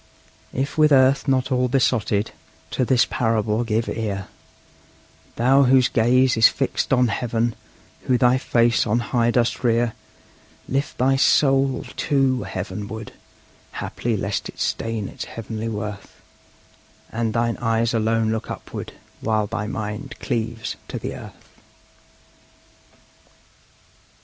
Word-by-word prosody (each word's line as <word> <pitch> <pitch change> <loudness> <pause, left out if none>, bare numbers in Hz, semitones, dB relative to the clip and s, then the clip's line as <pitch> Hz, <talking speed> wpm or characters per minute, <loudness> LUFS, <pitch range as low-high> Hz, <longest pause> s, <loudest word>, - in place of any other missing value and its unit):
If 135 +4 -3
with 155 0 +5
earth 135 +1 +4
not 130 0 +1
all 125 0 +2
besotted, 115 -5 +1 0.4
to - - 0
this 125 0 +3
parable 115 -1 0
give 115 0 -1
ear, 100 -4 -3 1.1
Thou 135 +4 +4
whose 130 0 +4
gaze 125 +3 +3
is 115 -1 +7
fixed - - -2
on 125 -2 +4
heaven, 115 +1 -1 0.5
who 125 - +3
thy 125 +1 +4
face 120 -2 +2
on 110 +2 +2 0.2
high 120 -1 +3
dost 120 +1 +1
rear: 115 -1 +2 0.7
Lift 140 +3 -2
thy 135 +2 +3
soul, 135 -1 +3
too, 135 -3 +1
heavenward; 105 +3 -6 0.6
haply 115 -2 -3
lest 100 +1 -3
it - - -12
stain 115 -3 -2
its - - -7
heavenly 115 0 -5
worth, 105 -2 -6 0.9
And 115 -1 -1
thine 115 0 +1
eyes 115 0 0
alone 110 0 +1
look 110 0 -3
upward, - - -7 0.3
while 110 -1 0
thy 105 +1 -4
mind 105 0 -5
cleaves 115 -2 -3
to - - -5
the - - -5
earth! - - -12
115 Hz, 125 wpm, -22 LUFS, 110-130 Hz, 1.1 s, is